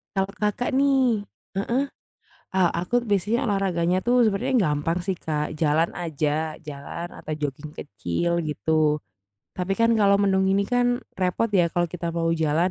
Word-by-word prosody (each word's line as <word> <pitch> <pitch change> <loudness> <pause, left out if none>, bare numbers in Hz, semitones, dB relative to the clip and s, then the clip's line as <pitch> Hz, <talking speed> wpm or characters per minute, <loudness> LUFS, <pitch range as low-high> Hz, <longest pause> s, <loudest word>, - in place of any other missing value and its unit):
Kalau 195 0 +1
Kakak 210 +3 -1
nih 260 -6 +3 0.3
heeh, 235 +7 +1 0.7
ah, 185 -2 +5
a - - -2
aku 180 +8 -2
biasanya 205 +6 +1
olahraganya 185 -5 +1
tuh 245 - +4
sebenernya 210 +4 +1 0.2
gampang 155 +4 0
sih, 190 0 -1
Kak, 150 -1 -1
jalan 160 +2 +3
aja, 155 -1 -1
jalan 145 +4 -6
atau 155 - -5
joging 145 +1 -4
kecil 100 - -2 0.2
gitu. 150 -1 -2 0.9
Tapi 185 +1 -1
kan, 230 0 +5
kalau 200 -1 +5
mendung 190 -1 +3
gini 195 +1 +3
kan, 245 +4 +1 0.3
repot 185 +4 +1
ya 185 -4 +4
kalau 175 -1 +1
kita 175 0 -5
mau 165 -1 +1
jalan 160 +4 +2
180 Hz, 155 wpm, -24 LUFS, 160-205 Hz, 0.9 s, ah